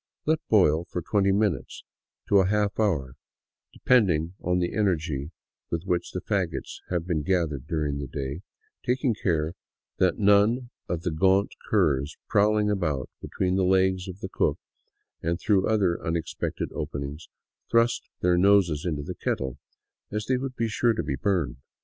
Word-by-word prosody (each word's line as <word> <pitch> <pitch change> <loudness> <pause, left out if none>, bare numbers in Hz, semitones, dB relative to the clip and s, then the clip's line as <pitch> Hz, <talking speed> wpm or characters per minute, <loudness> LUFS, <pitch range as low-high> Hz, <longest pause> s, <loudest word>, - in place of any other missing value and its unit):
Let 155 +1 +2
boil 85 -6 +4
from 90 -1 -5
twenty 100 +1 +2
minutes 100 -4 -1 0.4
to 100 - +5
a 95 - +3
half 105 0 0
hour 75 - 0 0.3
— - - -66
depending 90 -10 +2
on 90 +1 +1
the 90 -1 -1
energy 80 -8 0 0.4
with 85 0 -2
which 90 -2 -1
fagots 95 -6 -2
have 85 -2 -1
been 85 -4 0
gathered 80 -6 -1
during 75 -4 -1
the 70 - -4
day 70 +4 -5 0.2
— - - -42
taking 125 0 +1
care 80 -6 0 0.4
that 90 -2 +2
none 105 +5 +3 0.2
of 85 -1 -2
the 90 - -1
gaunt 95 +5 +2 0.2
curs 70 +2 +1
prowling 105 +1 +3
about 80 -10 -1
between 95 0 -1
the 95 - +2
legs 95 0 +2
of 95 +1 -8
the - - -4
cook - - +1 0.6
and 85 +1 -1
through 100 -3 +2
other 100 -6 +1
un 80 - -1
expected 80 -2 -3
openings 70 +3 -5 0.4
thrust 115 +1 +2
their 90 -1 +3
noses 90 -5 +4
into 75 -4 -2
the - - -5
kettle, 65 -2 -3 0.5
as 105 +1 -2
they 130 +2 +1
would 130 0 -4
be 115 - 0
sure 115 +2 +2
to 110 - -2
be 70 - -2
burned. 80 -6 0
90 Hz, 165 wpm, -26 LUFS, 80-105 Hz, 0.6 s, to